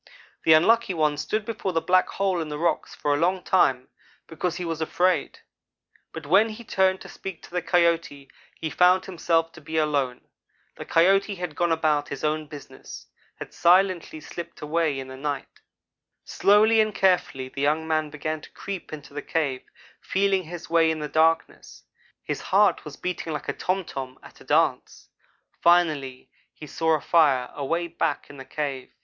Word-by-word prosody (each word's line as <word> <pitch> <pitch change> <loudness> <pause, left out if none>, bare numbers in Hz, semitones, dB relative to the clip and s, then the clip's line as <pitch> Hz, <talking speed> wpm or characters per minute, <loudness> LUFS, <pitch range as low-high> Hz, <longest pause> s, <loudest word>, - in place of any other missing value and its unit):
"The 160 - +7
Unlucky 210 +5 +4
one 155 -2 +1
stood 215 +8 -2
before 215 -4 -3
the 165 - +2
black 185 +2 +3
hole 190 -3 -1
in 155 - -5
the 150 - -4
rocks 170 +2 -1
for 145 - 0
a - - +1
long 180 +2 +1
time, 130 -9 +2 0.4
because 170 +2 -3
he 180 - -4
was 165 -1 -4
afraid; 180 +3 0 0.7
but 160 -2 -8
when 195 +9 +4
he 220 +2 -9
turned 190 -3 +1
to - - -10
speak 190 -4 -8
to - - -14
the 180 0 -1
Coyote 170 -5 +1 0.3
he 160 - -4
found 180 +1 +4
himself 165 -2 0
to - - -14
be 160 +2 -5
alone. 140 -5 0 0.5
The - - -8
Coyote 195 +4 +3
had 175 -4 -6
gone 175 +1 +1
about 155 -2 +1
his 140 - -6
own 155 0 -1
business 145 -1 -11 0.3
had - - -10
silently 180 -2 +2
slipped 170 +3 -9
away 155 -1 0
in 130 - -7
the 130 - -9
night. 145 0 -5 0.6
"Slowly 215 +2 +4
and 215 -1 -1
carefully 175 -9 +1
the 140 - -6
young 155 +3 +1
man 155 -1 0
began 155 +1 -4
to - - -13
creep 195 -3 -7
into 145 -2 -9
the 145 - -4
cave, 145 -6 -2 0.4
feeling 195 -1 0
his 170 +1 -8
way 165 -1 +3
in 160 - -1
the 150 -1 -5
darkness. 160 +1 0 0.4
His - - -4
heart - - +2
was - - -9
beating 175 -3 -4
like 150 - -5
a - - 0
tom 185 0 -2
tom 130 -3 -7
at - - -16
a - - -15
dance. - - 0 0.5
Finally 155 -7 +2 0.2
he 155 - -10
saw 160 +2 +1
a 150 - -3
fire 140 -7 +3
away 165 +5 -2
back 165 -3 -3
in 145 - -13
the 135 - -9
cave. 140 -4 -4
165 Hz, 180 wpm, -25 LUFS, 150-180 Hz, 0.7 s, The